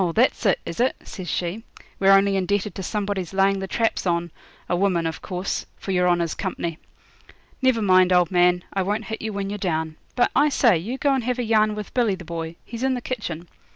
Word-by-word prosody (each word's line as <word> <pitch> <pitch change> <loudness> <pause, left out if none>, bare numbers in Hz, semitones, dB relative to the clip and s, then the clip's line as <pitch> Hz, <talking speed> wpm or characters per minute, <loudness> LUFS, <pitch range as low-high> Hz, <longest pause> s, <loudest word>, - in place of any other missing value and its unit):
that's 240 -1 +3
it, 190 - +3
is 170 - -6
it?' 255 +2 +2
says 185 -4 -7
she; 180 +5 -2 0.4
'we're 195 0 +5
only 195 0 +5
indebted 200 +2 0
to - - -6
somebody's 195 -2 -3
laying 195 0 +3
the 190 - -4
traps 225 -2 0
on 170 -1 0 0.4
a 175 - +1
woman 180 -2 +1
of 160 - -3
course 185 0 -3
for 195 - -5
your 180 -1 +3
honour's 170 -2 +1
company. 170 -4 -4 0.8
Never 255 -4 +3
mind, 185 -1 +5
old 180 -1 +4
man, 180 0 +3
I 195 - 0
won't 205 +3 -1
hit 220 - -5
you 220 - -3
when 200 -1 -3
you're 205 - -4
down. 160 -4 -2 0.2
But, 245 - +3
I 295 +1 +5
say, 240 -7 +4
you 210 +11 -3
go 280 +1 +2
and 265 -3 0
have 250 0 0
a 250 - -1
yarn 215 -1 +2
with 210 -1 -7
Billy 235 -6 +2
the 180 -2 -11
Boy 165 0 -5
he's 230 0 -7
in 265 0 +1
the - - -2
kitchen. 175 -10 -5
195 Hz, 220 wpm, -23 LUFS, 175-220 Hz, 0.8 s, we're